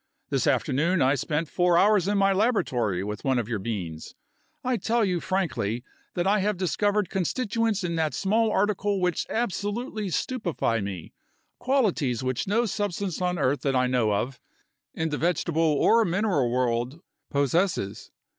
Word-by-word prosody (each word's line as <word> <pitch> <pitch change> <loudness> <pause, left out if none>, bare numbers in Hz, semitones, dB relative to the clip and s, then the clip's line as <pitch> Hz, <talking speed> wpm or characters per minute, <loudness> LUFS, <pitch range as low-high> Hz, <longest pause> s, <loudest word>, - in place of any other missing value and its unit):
This - - +1
afternoon 165 +7 +1
I 130 +2 +4
spent 150 +3 -1
four 175 +1 +2
hours 200 -1 +4
in 205 0 +1
my 195 0 +4
laboratory 125 - +1
with 105 +1 -5
one 130 -2 +1
of 120 -3 -1
your 115 -3 -2
beans. 95 -7 -5 0.5
I 255 -1 +1
tell 225 +3 +1
you 180 -3 0
frankly 140 - -1 0.3
that 175 - 0
I 205 +2 +3
have 205 0 0
discovered 205 +2 +1
constituents 215 - 0
in 170 -1 -2
that 155 -4 0
small 220 +3 +2
article 205 0 +1
which 180 -1 0
absolutely 215 0 -2
stupefy 175 - -1
me, 95 -4 -6 0.5
qualities 190 - +1
which 130 +4 -2
no 225 +5 +2
substance 200 -3 -2
on 180 0 0
earth 140 -2 +1
that 135 -2 0
I 125 0 +3
know 125 -4 +1
of, 125 +6 -2 0.6
in 160 0 -1
the 145 - -3
vegetable 170 -1 0
or 165 +9 +4
mineral 180 - +1
world, 125 +4 -1 0.3
possesses. 145 - 0
175 Hz, 155 wpm, -26 LUFS, 130-205 Hz, 0.6 s, I